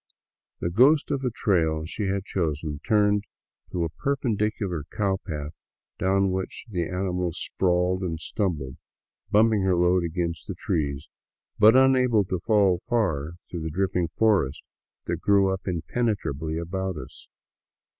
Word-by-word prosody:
The 85 Hz, -, -1 dB
ghost 140 Hz, -, +4 dB
of 140 Hz, -2 st, -1 dB
a 125 Hz, -, +1 dB
trail 80 Hz, -8 st, +1 dB
she 100 Hz, +4 st, -3 dB
had 95 Hz, 0 st, -1 dB
chosen 75 Hz, -5 st, -2 dB
turned 105 Hz, -1 st, +3 dB, 0.5 s
to 85 Hz, -, -1 dB
a 85 Hz, -, -1 dB
perpendicular 105 Hz, -, -1 dB
cowpath 80 Hz, -7 st, -2 dB, 0.5 s
down 95 Hz, 0 st, +2 dB
which 95 Hz, +4 st, -4 dB
the 90 Hz, -6 st, -2 dB
animal 90 Hz, -2 st, -2 dB
sprawled 90 Hz, +2 st, 0 dB
and 85 Hz, -3 st, -3 dB
stumbled, 80 Hz, -, -3 dB, 0.5 s
bumping 110 Hz, 0 st, +4 dB
her 95 Hz, -1 st, +2 dB
load 90 Hz, +1 st, +3 dB
against 85 Hz, 0 st, -3 dB
the -, -, -4 dB
trees, 70 Hz, -1 st, -2 dB, 0.5 s
but 110 Hz, +3 st, +7 dB
unable 130 Hz, -4 st, +4 dB
to 90 Hz, -1 st, -2 dB
fall 95 Hz, -2 st, +3 dB
far 85 Hz, -, 0 dB
through 85 Hz, -, -6 dB
the 80 Hz, -, -3 dB
dripping 90 Hz, +1 st, 0 dB
forest 95 Hz, -7 st, +1 dB, 0.4 s
that 85 Hz, 0 st, -3 dB
grew 100 Hz, -1 st, +3 dB
up 95 Hz, -, -7 dB
impenetrably 85 Hz, -, -2 dB
about 95 Hz, +1 st, -3 dB
us. -, -, -10 dB
95 Hz, 135 wpm, -25 LUFS, 85-105 Hz, 0.5 s, but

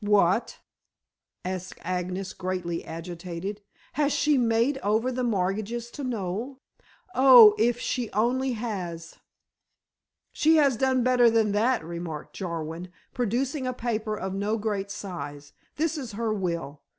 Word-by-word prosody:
"What?" 205 Hz, +1 st, +2 dB, 0.9 s
asked 185 Hz, 0 st, -5 dB
Agnes 185 Hz, +1 st, -3 dB
greatly 180 Hz, -2 st, -3 dB
agitated. 175 Hz, +4 st, -6 dB, 0.3 s
"Has 295 Hz, 0 st, +1 dB
she 300 Hz, +1 st, +2 dB
made 240 Hz, +2 st, +2 dB
over 220 Hz, +3 st, +1 dB
the 255 Hz, 0 st, -2 dB
mortgages 215 Hz, +2 st, -1 dB
to 290 Hz, -, -7 dB
Noel? 230 Hz, +2 st, -3 dB, 0.6 s
Oh, 250 Hz, -5 st, +9 dB
if 235 Hz, +2 st, +2 dB
she 245 Hz, -3 st, -2 dB
only 250 Hz, +5 st, +1 dB
has." 180 Hz, -8 st, -5 dB, 1.1 s
"She 320 Hz, +1 st, +3 dB
has 285 Hz, -5 st, +4 dB
done 260 Hz, +1 st, +2 dB
better 250 Hz, -1 st, +5 dB
than 225 Hz, -2 st, +2 dB
that," 225 Hz, -1 st, +1 dB
remarked 170 Hz, -2 st, -6 dB
Jarwin, 170 Hz, -1 st, -4 dB, 0.3 s
producing 255 Hz, +4 st, -1 dB
a 255 Hz, -, -1 dB
paper 220 Hz, -3 st, -2 dB
of 190 Hz, -1 st, -4 dB
no 205 Hz, +3 st, -1 dB
great 205 Hz, -2 st, -2 dB
size, 145 Hz, -8 st, -7 dB, 0.2 s
"this 320 Hz, +1 st, -1 dB
is 245 Hz, -6 st, -7 dB
her 225 Hz, +1 st, -1 dB
will. 170 Hz, -7 st, -3 dB
215 Hz, 130 wpm, -26 LUFS, 180-245 Hz, 1.1 s, Oh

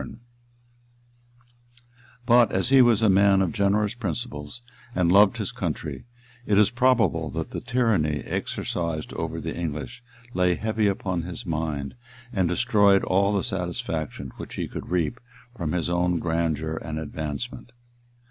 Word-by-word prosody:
] -, -, -6 dB, 2.2 s
But 120 Hz, -2 st, +5 dB
as 95 Hz, +6 st, 0 dB
he 135 Hz, -1 st, +7 dB
was 115 Hz, -3 st, +4 dB
a -, -, +5 dB
man 100 Hz, 0 st, +5 dB
of 95 Hz, -4 st, +1 dB
generous 105 Hz, +2 st, +1 dB
principles, 90 Hz, -2 st, -5 dB, 0.3 s
and 90 Hz, -2 st, +2 dB
loved 100 Hz, +1 st, +6 dB
his -, -, -3 dB
country, 75 Hz, -, -4 dB, 0.4 s
it 100 Hz, -, +3 dB
is 105 Hz, +1 st, +5 dB
probable 115 Hz, -, +2 dB
that -, -, -4 dB
the -, -, -4 dB
tyranny 110 Hz, -, +1 dB
exercised 85 Hz, -3 st, -3 dB
over -, -, -3 dB
the -, -, -5 dB
English 75 Hz, -, -5 dB, 0.3 s
lay 90 Hz, -1 st, +2 dB
heavy 110 Hz, +1 st, 0 dB
upon 95 Hz, -3 st, -1 dB
his 90 Hz, +7 st, -7 dB
mind, 75 Hz, -4 st, -3 dB, 0.4 s
and 95 Hz, -6 st, +1 dB
destroyed 100 Hz, +2 st, +4 dB
all 100 Hz, +2 st, +2 dB
the 100 Hz, -2 st, 0 dB
satisfaction 80 Hz, -6 st, -4 dB
which -, -, -8 dB
he -, -, -3 dB
could -, -, -7 dB
reap 90 Hz, +7 st, 0 dB, 0.4 s
from 85 Hz, -9 st, -3 dB
his 85 Hz, -2 st, -1 dB
own 90 Hz, 0 st, +1 dB
grandeur 80 Hz, -1 st, -1 dB
and 80 Hz, -1 st, -5 dB
advancement. 80 Hz, +11 st, -5 dB
90 Hz, 145 wpm, -25 LUFS, 80-105 Hz, 2.2 s, he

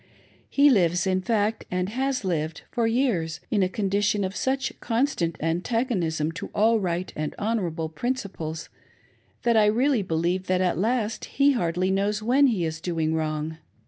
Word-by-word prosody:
He 285 Hz, 0 st, +5 dB
lives, 175 Hz, -6 st, +3 dB
in 185 Hz, 0 st, +1 dB
fact, 215 Hz, +2 st, 0 dB
and 180 Hz, +1 st, -1 dB
has 260 Hz, 0 st, -1 dB
lived, 160 Hz, -3 st, -2 dB
for 235 Hz, -3 st, +1 dB
years, 225 Hz, -10 st, 0 dB
in 205 Hz, -, +2 dB
a 185 Hz, -, +2 dB
condition 205 Hz, +1 st, 0 dB
of 190 Hz, +1 st, -3 dB
such 265 Hz, +1 st, -1 dB
constant 225 Hz, -, 0 dB
antagonism 170 Hz, -, 0 dB
to 200 Hz, +5 st, -6 dB
all 220 Hz, +2 st, +4 dB
right 180 Hz, -1 st, -2 dB
and 150 Hz, 0 st, -3 dB
honorable 185 Hz, -7 st, -1 dB
prin 240 Hz, +11 st, -2 dB
ciples, 165 Hz, -9 st, -6 dB, 0.7 s
that 235 Hz, -1 st, +3 dB
I 215 Hz, -1 st, +5 dB
really 245 Hz, +3 st, +2 dB
believe 180 Hz, +1 st, -1 dB
that 185 Hz, 0 st, +2 dB
at 180 Hz, -3 st, +1 dB
last 225 Hz, +1 st, 0 dB
he 280 Hz, +1 st, +3 dB
hardly 180 Hz, -5 st, 0 dB
knows 200 Hz, +2 st, +1 dB
^vheft 255 Hz, +6 st, +4 dB
he 190 Hz, -8 st, 0 dB
is 160 Hz, 0 st, -4 dB
doing 160 Hz, -3 st, -1 dB
wrong. 155 Hz, 0 st, -2 dB
190 Hz, 165 wpm, -25 LUFS, 165-230 Hz, 0.7 s, He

